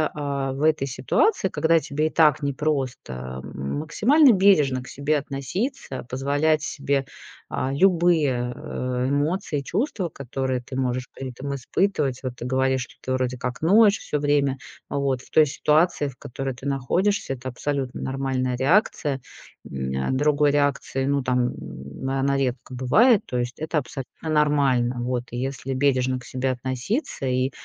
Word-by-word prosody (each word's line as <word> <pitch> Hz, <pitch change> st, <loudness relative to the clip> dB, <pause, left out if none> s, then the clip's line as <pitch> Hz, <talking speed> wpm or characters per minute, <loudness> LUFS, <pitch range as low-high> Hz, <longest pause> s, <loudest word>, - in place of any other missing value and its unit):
э, 140 Hz, -2 st, -2 dB
в 135 Hz, +2 st, -5 dB
этой 155 Hz, -2 st, +3 dB
ситуации, 190 Hz, -, +1 dB
когда 165 Hz, -1 st, +3 dB
тебе 150 Hz, 0 st, -1 dB
и -, -, -2 dB
так 150 Hz, -3 st, +4 dB
непросто, 130 Hz, -, -3 dB
м, 70 Hz, -, -4 dB
максимально 250 Hz, -, +5 dB
бережно 150 Hz, -10 st, +4 dB
к -, -, -13 dB
себе 145 Hz, +2 st, 0 dB
относиться, 140 Hz, -, -4 dB
позволять 145 Hz, +4 st, +1 dB
себе, 140 Hz, -3 st, -1 dB, 0.4 s
а, 130 Hz, -, -2 dB
любые, 155 Hz, -7 st, +3 dB
э, 125 Hz, 0 st, -3 dB
эмоции, 145 Hz, +2 st, 0 dB
чувства, 195 Hz, -, -2 dB
которые 130 Hz, -2 st, -3 dB
ты 130 Hz, +2 st, -9 dB
можешь 125 Hz, -1 st, -1 dB
при 135 Hz, -1 st, -5 dB
этом 140 Hz, +3 st, -5 dB
испытывать. 140 Hz, -1 st, 0 dB
Вот 130 Hz, -2 st, -4 dB
ты 125 Hz, -, -7 dB
говоришь, 130 Hz, +1 st, +1 dB
что -, -, -17 dB
ты 130 Hz, -, -2 dB
вроде 130 Hz, -1 st, -1 dB
как 125 Hz, 0 st, -4 dB
ноешь 205 Hz, +5 st, +5 dB
всё 150 Hz, -, -3 dB
время, 145 Hz, -2 st, +2 dB, 0.3 s
а -, -, -2 dB
вот 135 Hz, -3 st, 0 dB
в -, -, -18 dB
той 155 Hz, -, +6 dB
ситуации, 150 Hz, +1 st, +2 dB
в 130 Hz, -, -14 dB
которой 135 Hz, +2 st, -5 dB
ты 125 Hz, +2 st, -12 dB
находишься, 140 Hz, +7 st, 0 dB
это 130 Hz, 0 st, -8 dB
абсолютно 135 Hz, +1 st, -3 dB
нормальная 130 Hz, -2 st, -1 dB
реакция, 140 Hz, -, +2 dB, 0.4 s
м, 65 Hz, -1 st, -4 dB, 0.2 s
а. -, -, +1 dB
Другой 145 Hz, +2 st, +3 dB
реакции, 140 Hz, -2 st, 0 dB
ну, 140 Hz, 0 st, +1 dB
там, 125 Hz, -1 st, +1 dB, 0.5 s
она 135 Hz, +1 st, +1 dB
редко 130 Hz, -1 st, -2 dB
бывает. 195 Hz, -, +4 dB
То 125 Hz, -, -3 dB
есть 120 Hz, 0 st, -2 dB
это 155 Hz, +1 st, -2 dB
абсолютно 135 Hz, -2 st, -3 dB, 0.2 s
нормально. 140 Hz, -5 st, +2 dB
Вот 120 Hz, 0 st, -1 dB
и 120 Hz, -, -5 dB
если 135 Hz, +1 st, -3 dB
бережно 130 Hz, -1 st, +1 dB
к 125 Hz, -, -14 dB
себе 130 Hz, +2 st, -2 dB
относиться 130 Hz, -, -3 dB
и 130 Hz, +1 st, +1 dB
135 Hz, 160 wpm, -24 LUFS, 130-150 Hz, 0.5 s, той